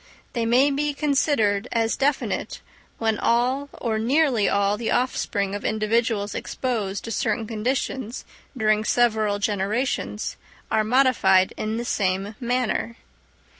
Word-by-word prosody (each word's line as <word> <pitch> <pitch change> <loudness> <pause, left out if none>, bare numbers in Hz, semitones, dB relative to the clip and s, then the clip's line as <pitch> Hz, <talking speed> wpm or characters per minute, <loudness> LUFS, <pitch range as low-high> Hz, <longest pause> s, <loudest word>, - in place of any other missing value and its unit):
They 230 -2 -1
may 260 +5 +4
be 290 +1 -1
considered 275 -8 +1
as 225 -1 +1
definite 280 +1 -1 0.4
when 220 -2 0
all 255 +4 +1
or 220 -3 -2
nearly 250 -2 +2
all 200 0 +2
the 225 +1 -3
offspring 200 -5 0
of 205 - -4
individuals 215 -1 0
exposed 210 -7 -3
to 230 - -6
certain 225 +1 -1
conditions 240 +2 -3 0.3
during 215 -1 +2
several 220 -3 +2
generations 205 - -2 0.3
are 215 - +3
modified 215 -6 +3
in 215 +1 -3
the 240 - -3
same 195 -1 -1
manner. 240 -1 -1
225 Hz, 125 wpm, -24 LUFS, 205-255 Hz, 0.4 s, may